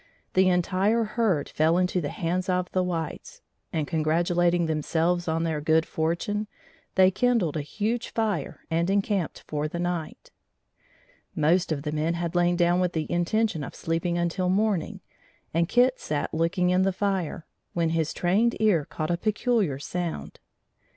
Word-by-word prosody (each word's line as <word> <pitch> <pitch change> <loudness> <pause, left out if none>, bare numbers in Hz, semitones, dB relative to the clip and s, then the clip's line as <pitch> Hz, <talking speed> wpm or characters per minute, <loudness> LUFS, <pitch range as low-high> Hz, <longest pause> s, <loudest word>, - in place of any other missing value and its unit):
The 185 0 +4
entire 190 +5 +2
herd 210 -9 0
fell 160 +3 +2
into 180 0 +1
the 145 - -3
hands 180 +2 -2
of 180 0 0
the 185 - +1
whites, 165 -4 -4 0.3
and, 155 -2 -1
congratulating 170 +2 +2
themselves 165 +3 0
on 165 +1 0
their 160 -2 -1
good 160 +2 +3
fortune, 170 +7 -2 0.5
they 190 0 +6
kindled 230 - +1
a 155 - -1
huge 215 +10 -2
fire 220 -2 -2
and 170 +2 +1
encamped 195 -3 0
for 150 0 -2
the 165 - -5
night. 175 - -4 1.0
Most 165 +2 +2
of 140 -3 -2
the 150 - -2
men 155 +2 0
had 170 -1 -3
lain 175 0 +3
down 175 0 +3
with 180 -1 0
the 160 -1 -1
intention 175 0 0
of - - -8
sleeping 165 +1 -1
until 175 +2 0
morning, 200 -2 0 0.5
and 170 +1 +1
Kit 250 +1 +3
sat 145 -1 -3
looking 170 +3 +1
in 180 +1 +3
the 195 +1 +2
fire, 185 -4 -2 0.3
when 170 -1 +1
his 160 -2 0
trained 210 +7 +2
ear 200 -9 +3
caught 155 +2 -3
a 170 - +1
peculiar 215 - 0
sound. 160 - -5
175 Hz, 160 wpm, -26 LUFS, 160-190 Hz, 1.0 s, they